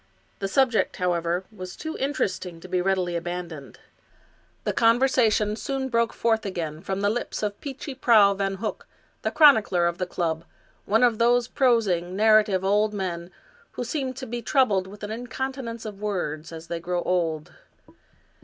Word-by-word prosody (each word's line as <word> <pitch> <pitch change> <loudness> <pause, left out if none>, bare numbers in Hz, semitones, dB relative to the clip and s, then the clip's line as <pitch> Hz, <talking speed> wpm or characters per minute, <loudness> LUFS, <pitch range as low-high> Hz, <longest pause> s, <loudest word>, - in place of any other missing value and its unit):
The 195 - -1
subject, 245 +3 +2
however, 175 0 0
was 185 -4 -8
too 315 0 -6
interesting 190 - -2
to 185 - -10
be 180 0 0
readily 185 -2 0
abandoned. 170 -4 -5 0.9
The - - -1
conversation 230 -3 +3
soon 270 +2 -3
broke 235 -1 +1
forth 225 -1 +1
again 165 -5 -4
from 195 0 -3
the 205 - +2
lips 240 -1 -3
of 205 -1 -3
Peechy 275 0 -6
Prauw 220 -6 +5
Van 195 0 -1
Hook, 210 +2 -5 0.3
the - - 0
chronicler 220 - +5
of 170 0 -1
the 185 - -1
club, 165 -2 -2 0.4
one 220 +4 +3
of 240 -2 +3
those 240 +1 +3
prosing, 205 -10 +1
narrative 215 -2 +4
old 210 +2 +2
men 175 -3 -4 0.4
who - - -4
seem 260 +1 -3
to 260 +1 -6
be 240 0 -4
troubled 215 -7 +2
with 205 +2 -12
an 205 - -4
incontinence 245 0 -5
of 205 -2 -7
words 170 -7 -3
as 165 0 -8
they 170 0 -4
grow 175 +1 -2
old. 165 -4 -1
205 Hz, 165 wpm, -25 LUFS, 180-235 Hz, 0.9 s, Prauw